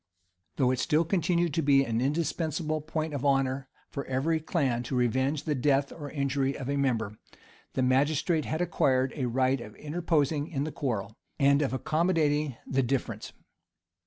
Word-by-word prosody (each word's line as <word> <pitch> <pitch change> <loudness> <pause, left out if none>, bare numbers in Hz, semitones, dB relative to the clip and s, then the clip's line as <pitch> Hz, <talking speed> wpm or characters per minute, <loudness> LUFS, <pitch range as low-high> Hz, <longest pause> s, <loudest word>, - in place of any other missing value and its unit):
Though 130 -3 +3
it 130 - -1
still 155 +6 +2
continued 170 -2 +1
to 165 - +1
be 140 -2 +5
an 115 -1 -1
indispensable 155 +2 -1
point 155 0 -3
of 140 -2 -3
honor 135 -1 +1 0.2
for 140 - -4
every 140 +5 0
clan 140 -7 0
to 130 - -3
revenge 130 +4 +1
the 155 - 0
death 140 0 +2
or 145 -3 -7
injury 140 -1 -1
of 130 - -6
a - - 0
member, 115 -7 -1 0.5
the 130 - 0
magistrate 145 +5 +2
had 160 +2 -2
acquired 135 -6 +2
a 130 -5 -1
right 130 +1 +1
of 105 -2 -10
interposing 150 -2 0
in 140 -5 -2
the 155 - -3
quarrel, 115 -7 -3 0.2
and 140 +1 +4
of 140 - 0
accommodating 150 -1 +1
the 135 0 +1
difference. 130 +1 -2
140 Hz, 165 wpm, -28 LUFS, 130-155 Hz, 0.5 s, be